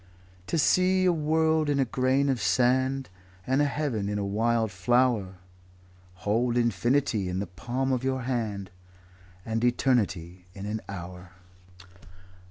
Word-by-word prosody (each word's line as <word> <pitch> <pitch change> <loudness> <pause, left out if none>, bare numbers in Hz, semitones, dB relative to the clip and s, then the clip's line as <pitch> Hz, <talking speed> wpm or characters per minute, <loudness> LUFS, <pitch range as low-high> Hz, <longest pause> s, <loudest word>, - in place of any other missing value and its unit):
'To 165 - -1
see 185 +4 +3
a 180 - +4
world 160 0 +1
in 140 -1 +1
a 135 - +3
grain 130 +3 +1
of 130 -5 0
sand, 130 +7 +1 0.4
And 135 +3 +2
a - - +3
heaven 135 -8 -2
in 105 - -2
a 100 - -2
wild 110 +2 0
flower; 105 +1 +1 0.9
Hold 120 +4 +1
infinity 120 -3 +1
in 90 - -3
the 100 - -2
palm 120 +9 -3
of 130 -1 0
your 130 -1 -1
hand, 110 -6 -3 0.7
And 115 +1 -2
eternity 100 -9 0
in 100 0 -7
an 105 +1 -3
hour'." 90 -1 -8
120 Hz, 140 wpm, -27 LUFS, 100-135 Hz, 0.9 s, a